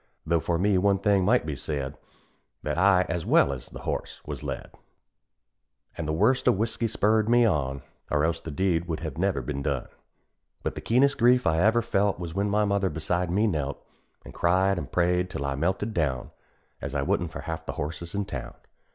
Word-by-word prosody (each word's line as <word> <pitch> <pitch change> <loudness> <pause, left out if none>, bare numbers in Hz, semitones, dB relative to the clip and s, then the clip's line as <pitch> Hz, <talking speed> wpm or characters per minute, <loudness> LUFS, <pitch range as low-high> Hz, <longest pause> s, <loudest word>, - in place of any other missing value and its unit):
Though 85 +1 +2
for 85 +1 0
me 95 +1 +3
one 100 +1 +3
thing 100 -1 +2
might 120 +3 +3
be 75 -2 -3
said 70 0 -4 0.7
That 75 - -1
I, 95 +1 +5
as 85 0 -2
well 70 - +4
as 65 -2 -8
the - - -10
horse, - - -4
was - - -5
led; - - -5 1.2
And 85 -3 -4
the - - 0
worst 110 +11 +2
of - - +4
whisky 115 +2 -1
spurred 110 +1 +2
me 120 0 +5
on, 70 -9 0 0.3
Or 75 0 +2
else 80 0 0
the - - -8
deed 85 +2 0
would 80 -2 -3
have 80 -2 -5
never 95 -8 0
been 70 +2 -3
done. 70 -3 -2 0.7
But - - -1
the - - -7
keenest 135 +4 +3
grief 125 0 +5
I 80 -1 +2
ever 110 +5 +4
felt 100 -3 +1
Was 85 -2 -6
when 100 +2 0
my 105 +1 +2
mother 100 -1 +1
beside 85 +2 -1
me 100 +5 +2
knelt, 75 -8 -1 0.5
An' - - -9
cried 95 +2 +2
an' - - -5
prayed, 90 +1 +1
till 70 - -4
I 70 - -1
melted 95 +9 -1
down, 70 - -1 0.5
As 70 0 -5
I 70 - +1
wouldn't 85 +4 0
for - - -6
half 80 -1 -5
the - - -3
horses 85 +5 -5
in 100 0 -1
town. 65 -11 -6
90 Hz, 205 wpm, -27 LUFS, 75-100 Hz, 1.2 s, I